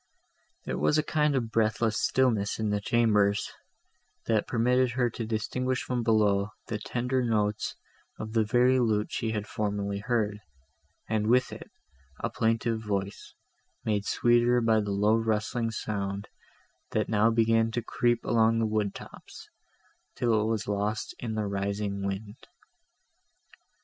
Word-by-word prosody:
There - - -3
was 150 - +3
a 155 - +2
kind 150 -1 +1
of 115 -4 -1
breathless 110 0 +1
stillness 115 -6 +1
in 110 -1 -1
the 105 0 0
chambers, 105 -3 +2 0.7
that 110 -2 +1
permitted 125 +1 +2
her 120 -2 +1
to 115 0 -5
distinguish 125 +3 -1
from 125 -1 -2
below 105 -3 +2
the 110 -3 -4
tender 125 +4 -1
notes 105 -3 0 0.4
of 110 0 -6
the 110 -1 +3
very 125 +4 +3
lute 110 -3 +1
she 115 - -2
had 105 -2 -2
formerly 100 -1 -2
heard, 105 -2 -1 0.7
and 110 -1 0
with 125 +2 +3
it, - - -9 0.5
a - - -2
plaintive 115 0 0
voice, 100 -2 -4 0.5
made 105 -2 0
sweeter 120 +1 +3
by 115 -2 +3
the 105 -1 -2
low 105 +3 +3
rustling 115 +1 -1
sound, 100 -2 -4 0.6
that - - +1
now 110 0 +3
began 115 0 +3
to 120 0 -3
creep 120 0 0
along 115 0 +3
the 115 - +1
wood 105 -2 -1
tops, - - -12 0.6
till 115 -4 +2
it - - 0
was 110 -1 -1
lost 105 +1 -2
in 115 -2 -4
the 110 -1 -1
rising 100 0 -2
wind. 100 +3 -5
110 Hz, 145 wpm, -28 LUFS, 105-120 Hz, 0.7 s, was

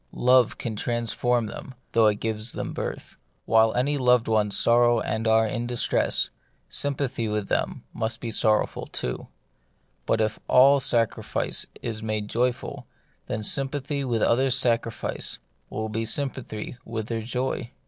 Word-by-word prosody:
Love 125 -1 +4
can 115 -2 -4
transform 120 +1 0
them, 125 +5 -8 0.2
though 115 -1 +5
it 105 - +3
gives 110 +1 -3
them - - -4
birth. - - -5 0.3
While 110 0 +4
any 140 +4 +1
loved 125 -2 +4
ones 105 -2 +2
sorrow 120 0 +4
and 110 +1 -2
are 110 0 +4
in 120 +2 -2
distress, 120 -1 +1 0.4
sympathy 135 -4 -1
with 105 -1 -2
them - - -1
must 115 0 -3
be 115 - -4
sorrowful 110 0 +1
too; - - -3 0.8
but 115 - +2
if 110 0 0
all 135 +2 +6
sac 115 -3 +3
rifice - - -2 0.2
is 115 -2 -4
made 110 -1 -2
joyful, 120 +1 -2 0.4
then 110 - -3
sympathy 140 +3 0
with 120 -4 0
others' 130 +2 +4
sacrifice 115 -3 -1 0.3
will 110 0 -3
be 110 +1 -2
sympathy 125 -2 -3
with 110 -2 -4
their 115 0 -3
joy. 125 +1 -3
115 Hz, 150 wpm, -25 LUFS, 110-125 Hz, 0.8 s, all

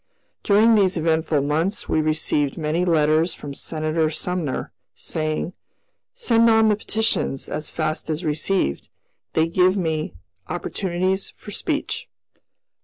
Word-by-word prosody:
During 215 +3 +5
these 195 -4 +3
eventful 160 -2 +1
months 160 +8 0
we 155 - +2
received 155 -2 0
many 160 +2 0
letters 160 0 +3
from 145 -1 -7
Senator 155 +2 -1
Sumner, 165 -3 -3 0.2
saying, 155 +2 -2 0.6
"Send 230 - +4
on 220 -1 +5
the 210 - +4
petitions 215 -9 -1
as 150 0 -4
fast 155 0 -2
as 160 +3 -2
received; 155 - 0 0.4
they 160 +1 +3
give 180 +3 +3
me 160 - -1 0.3
opportunities 185 +1 -1
for - - -10
speech." - - -3
165 Hz, 120 wpm, -23 LUFS, 155-190 Hz, 0.6 s, During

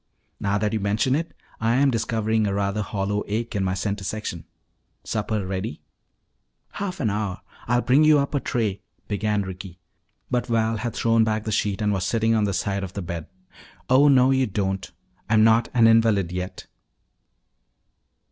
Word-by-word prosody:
"Now 100 0 0
that 105 +1 -1
you 110 - 0
mention 105 +6 +1
it, 165 +4 -1 0.3
I 115 +1 +1
am 135 +1 +4
discovering 110 -2 0
a 100 - -1
rather 100 +1 -1
hollow 105 0 -2
ache 115 +3 -3
in 100 - 0
my 95 0 0
center 100 +1 -3
section. 95 -4 -5 0.6
Supper 105 -2 -2
ready?" 95 -2 -4 0.9
"Half 185 -5 -4
an 110 -5 +1
hour. 100 -3 -3 0.3
I'll 120 +1 +2
bring 135 +5 +4
you 155 -1 +6
up 140 +1 -1
a 140 - +2
tray 110 -7 -2
" - - -42
began 105 0 0
Ricky. 95 -1 -8 0.5
But 125 -1 0
Val 115 -1 +1
had 115 +2 -4
thrown 115 -1 +3
back 110 -1 -1
the 110 - -3
sheet 105 0 0
and 105 0 +2
was 95 -2 -1
sitting 115 +2 +1
on 110 -2 +2
the 100 - 0
side 100 0 -1
of 95 -1 -6
the 100 - -4
bed. 85 -2 -5 0.6
"Oh, 135 +3 +6
no, 130 -2 +5
you 130 -1 +2
don't! 95 -2 -2 0.4
I'm 110 0 +5
not 115 +1 +4
an 120 -2 +4
invalid 115 -5 +4
yet." 90 +1 -5
110 Hz, 180 wpm, -24 LUFS, 100-115 Hz, 0.9 s, you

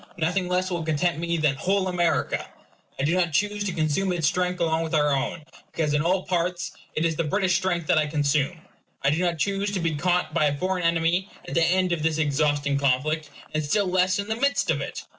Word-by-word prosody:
Nothing 180 +3 0
less 185 +1 0
will 175 -1 -1
content 160 +2 0
me 170 0 -1
than 150 -3 +2
WHOLE 190 +4 +1
AMERICA. 175 -2 0 0.5
I - - 0
do 155 +4 +2
not 175 -3 +1
choose 205 +4 0
to 195 - -1
consume 165 +4 0
its 170 -3 0
strength 180 +3 0
along 160 -1 +1
with 160 -1 -2
our 150 -1 +3
own, 140 +3 -2 0.3
because 155 -3 -1
in 150 - +2
all 185 +3 +1
parts 180 0 -1 0.2
it 160 - +1
is 165 -1 +1
the 165 - +1
British 185 +3 +1
strength 175 -2 -1
that 180 -2 +3
I 155 - +1
consume. 150 +2 0 0.4
I 140 - +3
do 155 - 0
not 175 -2 0
choose 200 +4 0
to 190 - 0
be 165 -2 0
caught 175 +1 0
by 155 -2 +3
a 145 -1 +1
foreign 185 +2 -1
enemy 170 +3 +1 0.2
at - - -6
the 165 - +3
end 185 +2 +2
of 170 -2 0
this 160 0 +1
exhausting 145 -1 +1
conflict; 145 +3 0 0.2
and 155 0 0
still 200 +8 +1
less 185 0 +2
in 200 0 -3
the 220 - -1
midst 280 +3 +1
of - - -1
it. - - -5
170 Hz, 230 wpm, -25 LUFS, 155-185 Hz, 0.5 s, our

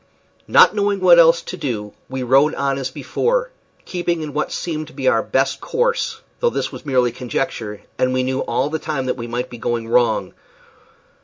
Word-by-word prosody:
Not - - +6
knowing 205 -1 0
what 180 -2 +7
else 165 0 +5
to - - -6
do 105 -6 -4 0.2
we 130 -1 -3
rowed 135 +4 +4
on 140 -1 -1
as 130 -1 -3
before, - - -1 0.3
keeping 175 -2 -2
in 150 -2 -6
what 150 +1 -1
seemed 155 -2 -4
our 115 -3 +4
best 135 +1 0
course, 485 0 -1 0.2
though 485 - +3
this - - -3
was - - -10
mere 125 -3 +2
conjecture, 120 -3 -4 0.2
and 130 - +2
we 130 0 +1
knew 130 +1 -1
all 140 +2 -1
the 160 - -1
time 150 -4 -3
that 130 - -1
we 120 -2 -6
might 120 +1 -4
be 120 - -9
going 115 0 -2
wrong. 120 +1 +2
135 Hz, 185 wpm, -20 LUFS, 125-170 Hz, 0.3 s, what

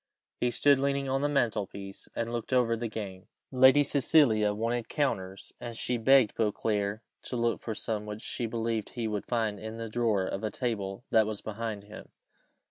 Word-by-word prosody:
He 125 - +2
stood 140 +3 +4
leaning 140 0 0
on 135 +1 0
the 145 - +1
mantelpiece, 105 -7 -2
and 115 0 -2
looking 120 +2 0
over 115 -2 +2
the 115 +1 -3
game. 100 -4 -7 0.2
Lady 130 +2 +6
Cecilia 130 -7 +4
wanted 115 +2 -2
counters, 95 -10 -2
and 120 -1 -6
she 125 0 -1
begged 130 -1 +5
Beauclerc 105 -1 -1 0.2
to - - -6
look 115 0 0
for 110 - -4
some 105 -1 -3
which 105 +1 -6
she 120 - -3
believed 115 -1 -2
he 115 -2 -3
would 105 -2 -3
find 110 -4 0
in 110 +2 -6
the 115 -1 -5
drawer 110 -4 +1
of 95 - -4
a 110 - 0
table 105 -3 -3
that 110 -1 +5
was 110 -2 -4
behind 110 -1 -4
him. 105 +1 -11
115 Hz, 185 wpm, -29 LUFS, 105-125 Hz, 0.2 s, Lady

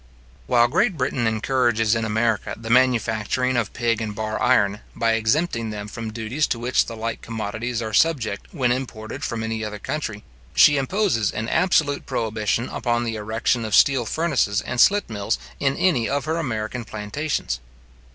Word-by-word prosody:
While 120 -1 +4
Great 185 - +1
Britain 130 -3 0
encourages 115 -1 +1
in 115 -1 0
America 110 0 0
the 115 0 -5
manufacturing 125 0 +2
of 120 -4 0
pig 115 -2 0
and 105 -2 -4
bar 110 0 -3
iron, 105 -4 +3 0.2
by 115 -1 +1
exempting 115 +2 0
them 105 -1 -5
from 115 +1 -6
duties 115 +7 -1
to - - -1
which 120 +2 +1
the 115 - -6
like 115 +1 -4
commodities 115 +2 -4
are 110 -1 -5
subject 115 -7 +1
when 130 -7 +1
imported 125 +1 -4
from 115 -6 -3
any 115 -1 -3
other 105 0 -4
country, 105 -3 -4 0.3
she 145 - +7
imposes 140 - +1
an 110 - -3
absolute 150 -4 +1
prohibition 110 -1 -1
upon 120 -1 -1
the 115 -1 -2
erection 110 +3 -1
of 110 -1 0
steel 130 -5 +4
furnaces 140 -11 +1
and 120 -1 0
slit 205 +1 +4
mills 100 - -2 0.2
in 135 -1 +1
any 155 -12 +2
of 140 +1 -1
her 160 +1 -1
American 120 -5 -3
plantations. 110 - -3
115 Hz, 170 wpm, -23 LUFS, 110-130 Hz, 0.3 s, she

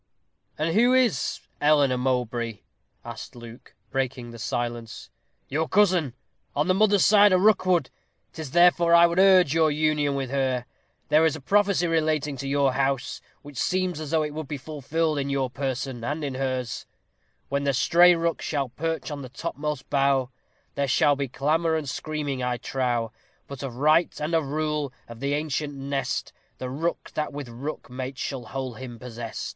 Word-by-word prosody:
"And 160 +2 0
who 245 +4 +4
is 235 - +1 0.2
Eleanor 145 -3 +4
Mowbray?" 120 -3 -1 0.4
asked - - -8
Luke, 120 0 -12 0.2
breaking 130 -3 -2
the 115 - -10
silence. 120 0 -4 0.4
"Your 155 +4 -1
cousin. 180 - +3 0.4
On 150 +3 +1
the 185 - +4
mother's 205 0 +4
side 205 0 +6
a 185 - +5
Rookwood. 185 -6 +3 0.4
'Tis 160 -4 -6
therefore 175 +2 +5
I 170 0 +8
would 170 +1 +1
urge 185 -6 +6
your 160 -1 +4
union 150 -1 +1
with 135 -2 -3
her. 130 -3 0 0.4
There 155 +2 +5
is 160 -1 +3
a - - -7
prophecy 200 +4 +2
relating 155 -3 0
to 135 - -5
your 140 -1 +2
house, 135 -1 -1 0.2
which 145 -3 -8
seems 185 -3 0
as 155 -2 -5
though 160 0 +2
it 150 -1 -4
would 155 -1 -5
be 145 - -4
fulfilled 155 +2 -2
in 140 0 -2
your 135 -2 -1
person 130 -2 -3
and 150 +5 -3
in 140 -2 -2
hers: 130 -2 -3 0.6
When 140 0 -1
the 140 - +2
stray 175 +6 +5
Rook 165 0 -1
shall 140 -4 -2
perch 160 +5 -3
on 145 -1 -5
the 130 - -8
topmost 150 -1 -4
bough, 135 -2 +2 0.4
There 140 0 -1
shall 145 +3 +3
be 140 0 -2
clamor 160 +5 +1
and 155 -3 -2
screaming, 145 -1 -3
I 125 -1 -1
trow; 120 -2 -1 0.3
But 140 -3 -8
of 135 -4 -5
right, 155 +6 +3
and 150 +3 -3
of 160 -4 +2
rule, 150 -1 -1 0.2
of 115 -1 -10
the 140 +2 0
ancient 150 -1 -2
nest, 140 0 -3 0.2
The 130 0 -5
Rook 165 +6 -3
that 155 - -2
with 140 -3 -7
Rook 135 +6 -6
mates 130 +1 -5
shall 130 -4 -4
hold 130 -3 -5
him 125 -2 -8
possest." 115 -1 -6
145 Hz, 175 wpm, -25 LUFS, 130-160 Hz, 0.6 s, I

